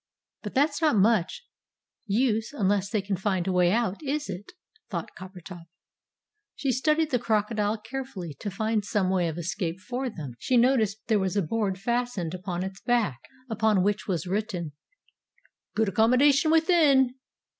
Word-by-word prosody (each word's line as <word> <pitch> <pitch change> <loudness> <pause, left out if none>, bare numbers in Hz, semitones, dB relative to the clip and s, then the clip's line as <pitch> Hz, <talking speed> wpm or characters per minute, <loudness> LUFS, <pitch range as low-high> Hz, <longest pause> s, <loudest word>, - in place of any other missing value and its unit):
"But 210 - -7
that's 285 +3 +2
not 310 -7 +3
much 215 - +2 0.6
use 225 +2 +1
unless 200 -5 +1
they 210 -2 -1
can 200 0 -1
find 190 -3 -1
a - - +1
way 180 -1 +3
out, 220 -3 0
is 295 0 -2
it?" 190 +4 -8 0.4
thought - - -4
Coppertop. 185 -2 -10 0.9
She 275 - -1
studied 305 +4 +1
the 250 - +2
crocodile 215 -1 0
carefully 220 - -6
to 205 - -4
find 215 +2 -1
some 195 -2 0
way 180 -2 +1
of 160 0 -4
escape 175 0 -3
for 250 +5 -3
them. 150 - -7
She 250 - +1
noticed 230 -4 +2
that - - -54
there 220 -3 +3
was 190 +1 -1
a 200 - +2
board 195 +2 -1
fastened 235 -6 -2
on 180 -2 -2
to - - -2
its 190 - -17
back, 230 - +1 0.3
upon 215 -4 +2
which 205 +1 0
was 185 -3 -1
written 185 -4 -2 1.0
"GOOD 220 -1 +2
ACCOMMODATION 255 - +4
WITHIN!" 315 -6 +4
210 Hz, 165 wpm, -27 LUFS, 190-245 Hz, 1.0 s, ACCOMMODATION